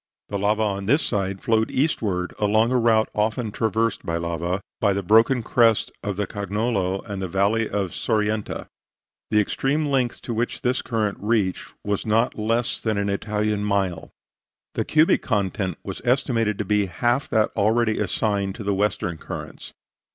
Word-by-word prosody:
The 100 Hz, -, -2 dB
lava 105 Hz, +2 st, +2 dB
on 100 Hz, -2 st, -2 dB
this 145 Hz, +7 st, +3 dB
side 100 Hz, -3 st, -2 dB
flowed 110 Hz, -1 st, +2 dB
eastward, 105 Hz, -, 0 dB
along 110 Hz, +3 st, +3 dB
a 130 Hz, -, +3 dB
route 110 Hz, -2 st, +3 dB
often 110 Hz, +1 st, 0 dB
traversed 110 Hz, 0 st, 0 dB
by 85 Hz, 0 st, -1 dB
lava, 85 Hz, +2 st, -2 dB, 0.2 s
by 100 Hz, -2 st, +3 dB
the 100 Hz, 0 st, -2 dB
broken 115 Hz, +6 st, +4 dB
crest 115 Hz, -2 st, +3 dB
of 100 Hz, -2 st, -3 dB
the 105 Hz, +1 st, -1 dB
Cognolo 100 Hz, -1 st, -1 dB
and 100 Hz, -3 st, -5 dB
the 95 Hz, -, -2 dB
valley 100 Hz, +5 st, +1 dB
of 100 Hz, -3 st, -1 dB
Sorienta. 105 Hz, -1 st, -1 dB, 0.6 s
The 105 Hz, -, +3 dB
extreme 135 Hz, +8 st, 0 dB
length 130 Hz, -4 st, 0 dB
to 120 Hz, -, -3 dB
which 120 Hz, +4 st, -2 dB
this 125 Hz, 0 st, +1 dB
current 110 Hz, -4 st, -1 dB
reached 105 Hz, -3 st, -1 dB
was 100 Hz, -1 st, -1 dB
not 115 Hz, +3 st, +2 dB
less 115 Hz, +4 st, 0 dB
than 110 Hz, -2 st, 0 dB
an 100 Hz, 0 st, 0 dB
Italian 105 Hz, +1 st, -1 dB
mile. 100 Hz, -5 st, -1 dB, 0.6 s
The -, -, -1 dB
cubic 155 Hz, +1 st, +4 dB
content 95 Hz, -4 st, -1 dB
was -, -, -6 dB
estimated 120 Hz, -4 st, +1 dB
to 105 Hz, -, -2 dB
be 105 Hz, 0 st, +2 dB
half 120 Hz, +9 st, 0 dB
that 110 Hz, -1 st, +2 dB
already 110 Hz, +2 st, +2 dB
assigned 100 Hz, -1 st, 0 dB
to 110 Hz, -, -7 dB
the 100 Hz, 0 st, 0 dB
western 95 Hz, -4 st, -1 dB
currents. -, -, -7 dB
105 Hz, 165 wpm, -23 LUFS, 100-115 Hz, 0.6 s, broken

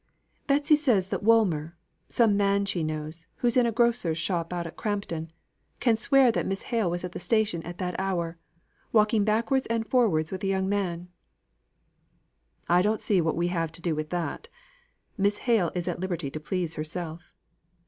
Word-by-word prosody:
"Betsy 290 Hz, +2 st, +4 dB
says 235 Hz, -11 st, +1 dB
that -, -, -2 dB
Woolmer 180 Hz, -8 st, +3 dB, 0.3 s
(some 225 Hz, -4 st, +3 dB
man 200 Hz, 0 st, +2 dB
she 185 Hz, -3 st, -1 dB
knows, 155 Hz, +1 st, -5 dB
who 245 Hz, -, -1 dB
is 235 Hz, -, +2 dB
in 250 Hz, -2 st, +4 dB
a -, -, +1 dB
grocer's 235 Hz, -8 st, +1 dB
shop 170 Hz, -1 st, -2 dB
out 175 Hz, -1 st, -3 dB
at 165 Hz, -, -8 dB
Crampton) 185 Hz, -7 st, -3 dB, 0.5 s
can 235 Hz, -3 st, +3 dB
swear 260 Hz, +2 st, +4 dB
that -, -, -1 dB
Miss 195 Hz, 0 st, -3 dB
Hale 225 Hz, -7 st, 0 dB
was 175 Hz, +1 st, -2 dB
at 180 Hz, -, -4 dB
the -, -, -6 dB
station 190 Hz, -1 st, +1 dB
at 175 Hz, +1 st, -8 dB
that 180 Hz, 0 st, -3 dB
hour, 170 Hz, -3 st, -2 dB, 0.5 s
walking 215 Hz, -1 st, +4 dB
backwards 230 Hz, +5 st, +1 dB
and 230 Hz, -1 st, -1 dB
forwards 185 Hz, -12 st, +2 dB
with 190 Hz, 0 st, -5 dB
a -, -, 0 dB
young 190 Hz, 0 st, 0 dB
man." 180 Hz, -3 st, -2 dB, 1.6 s
"I 175 Hz, +1 st, +4 dB
don't 210 Hz, +3 st, +1 dB
see 195 Hz, -4 st, +2 dB
what 160 Hz, 0 st, -1 dB
we 175 Hz, +1 st, +1 dB
have 165 Hz, -3 st, -1 dB
to 155 Hz, -, -5 dB
do 170 Hz, -, +1 dB
with 155 Hz, 0 st, -3 dB
that. 175 Hz, -, -3 dB, 0.7 s
Miss 200 Hz, +1 st, +2 dB
Hale 225 Hz, -9 st, +3 dB
is 175 Hz, 0 st, -3 dB
at 175 Hz, -1 st, -2 dB
liberty 175 Hz, -6 st, -3 dB
to 155 Hz, -, -5 dB
please 170 Hz, +1 st, -3 dB
herself." 165 Hz, +2 st, -6 dB
185 Hz, 185 wpm, -27 LUFS, 170-220 Hz, 1.6 s, Betsy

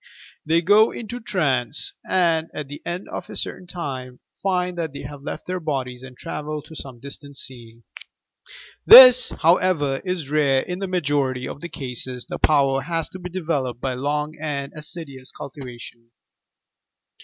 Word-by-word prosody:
They 165 Hz, +2 st, +3 dB
go 210 Hz, +5 st, +6 dB
into 235 Hz, +2 st, -6 dB
trance 145 Hz, -, -1 dB
and, 165 Hz, -3 st, +1 dB
at 150 Hz, -2 st, -5 dB
the 145 Hz, +1 st, -9 dB
end 175 Hz, +3 st, -4 dB
of -, -, -6 dB
a -, -, -8 dB
certain 180 Hz, -, -3 dB
time, 130 Hz, -8 st, -6 dB, 0.2 s
find 180 Hz, -2 st, 0 dB
that 160 Hz, -4 st, -3 dB
they -, -, -7 dB
have 145 Hz, -1 st, -8 dB
left -, -, -6 dB
their 185 Hz, 0 st, -3 dB
bodies 130 Hz, -6 st, -3 dB
and 130 Hz, -1 st, -12 dB
travelled 150 Hz, 0 st, -5 dB
to 160 Hz, -, -12 dB
some 130 Hz, -5 st, -8 dB
distant 140 Hz, +1 st, -10 dB
scene! 120 Hz, -3 st, -10 dB, 1.0 s
This, 255 Hz, -1 st, +10 dB
however, 160 Hz, -5 st, +2 dB
is 180 Hz, -7 st, -3 dB
rare: 140 Hz, -3 st, +3 dB
in 180 Hz, +4 st, -5 dB
the 195 Hz, -, -3 dB
ma 180 Hz, -1 st, 0 dB
jority 135 Hz, -4 st, 0 dB
of 145 Hz, -, -8 dB
cases 125 Hz, -2 st, -4 dB
the -, -, -6 dB
power 135 Hz, -3 st, +3 dB
has 165 Hz, +3 st, -2 dB
to 185 Hz, -, -9 dB
be 180 Hz, 0 st, -6 dB
developed 150 Hz, -9 st, -2 dB
by 130 Hz, 0 st, -2 dB
long 150 Hz, +4 st, -2 dB
and 140 Hz, -2 st, -3 dB
assiduous 150 Hz, -4 st, -8 dB
cultivation. 120 Hz, -4 st, -10 dB
145 Hz, 160 wpm, -23 LUFS, 130-175 Hz, 1.0 s, This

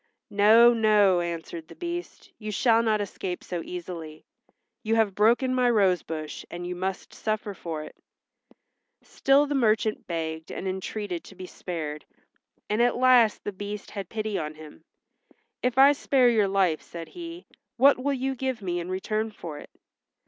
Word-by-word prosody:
"No, 220 Hz, +4 st, +7 dB
no," 210 Hz, -5 st, +4 dB
answered 170 Hz, -1 st, -5 dB
the -, -, -13 dB
Beast. 345 Hz, 0 st, -6 dB
"You 215 Hz, -1 st, -5 dB
shall 230 Hz, +2 st, +3 dB
not 215 Hz, -2 st, +1 dB
escape 185 Hz, -2 st, -5 dB
so 175 Hz, -2 st, -4 dB
easily. 170 Hz, -3 st, -7 dB, 0.6 s
You 220 Hz, 0 st, 0 dB
have 220 Hz, -3 st, +2 dB
broken 235 Hz, +6 st, +3 dB
my 250 Hz, -1 st, +3 dB
rose 195 Hz, -7 st, +3 dB
bush 155 Hz, -2 st, -6 dB
and 175 Hz, 0 st, -6 dB
you 180 Hz, 0 st, -4 dB
must 190 Hz, +1 st, -4 dB
suffer 215 Hz, -1 st, -3 dB
for 165 Hz, -4 st, -5 dB
it." 155 Hz, -, -11 dB, 1.1 s
Still 275 Hz, +2 st, +3 dB
the 290 Hz, -, -3 dB
merchant 220 Hz, -4 st, +1 dB
begged 160 Hz, -1 st, -4 dB
and 190 Hz, -, -5 dB
entreated 190 Hz, -1 st, -4 dB
to 195 Hz, -, -13 dB
be 185 Hz, 0 st, -8 dB
spared 155 Hz, -5 st, -6 dB, 0.6 s
and 210 Hz, +2 st, +1 dB
at 245 Hz, 0 st, +3 dB
last 250 Hz, -3 st, +4 dB
the 205 Hz, -, -4 dB
Beast 205 Hz, +1 st, -7 dB
had 195 Hz, -3 st, -6 dB
pity 215 Hz, -2 st, -2 dB
on 155 Hz, -1 st, -5 dB
him. 155 Hz, 0 st, -13 dB, 0.8 s
"If 250 Hz, 0 st, 0 dB
I 275 Hz, +2 st, +8 dB
spare 270 Hz, -3 st, +3 dB
your 215 Hz, -4 st, +3 dB
life," 190 Hz, -5 st, +1 dB
said 170 Hz, -1 st, -9 dB
he, 340 Hz, 0 st, -9 dB, 0.3 s
"what 275 Hz, +2 st, +6 dB
will 285 Hz, 0 st, +1 dB
you 265 Hz, +1 st, -1 dB
give 260 Hz, -3 st, -3 dB
me 175 Hz, -1 st, -1 dB
in 175 Hz, +1 st, -5 dB
return 215 Hz, +4 st, -2 dB
for 165 Hz, -8 st, -8 dB
it?" -, -, -12 dB
205 Hz, 170 wpm, -26 LUFS, 175-235 Hz, 1.1 s, I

